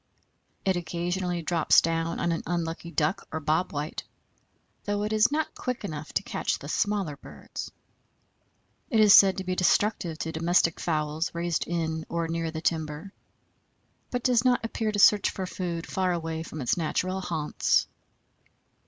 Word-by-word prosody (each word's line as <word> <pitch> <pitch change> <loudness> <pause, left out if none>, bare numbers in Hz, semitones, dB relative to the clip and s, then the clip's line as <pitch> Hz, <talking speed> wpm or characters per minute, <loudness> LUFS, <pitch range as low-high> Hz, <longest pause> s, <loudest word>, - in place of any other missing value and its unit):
It 190 -1 +2
occasionally 175 +1 -2
drops 165 -1 +4
down 165 0 -1
on 170 - 0
an 165 - -1
unlucky 170 -1 -3
Duck 160 +2 -1
or 160 - -2
Bob 155 +4 0
White, 150 +2 -4 0.8
though 205 0 -1
it 210 +1 -1
is 215 +4 +4
not 315 +1 -1
quick 250 -4 -4
enough 155 -4 -6
to - - 0
catch - - -2
the - - -10
smaller 200 -8 0
birds. - - -8 1.2
It 230 -7 +2
is 210 -2 +8
said 195 -1 +7
to 190 - -3
be 185 0 -2
destructive 180 -2 +1
to 160 - -3
domestic 165 +1 +2
fowls 155 -1 -1
raised 170 -1 -1
in 160 -2 -2
or 170 -1 -1
near 165 0 -2
the 160 0 -5
timber, 160 +3 -2 1.0
but 245 -1 -3
does 245 -2 +3
not 250 -2 +2
appear 225 -1 -2
to 210 - -3
search 205 0 +6
for 190 - -4
food 175 -2 -4
far 185 -1 0
away 165 -2 -3
from 155 -2 -7
its 125 - +1
natural 185 +3 -1
haunts. 160 -4 +1
170 Hz, 160 wpm, -27 LUFS, 160-195 Hz, 1.2 s, is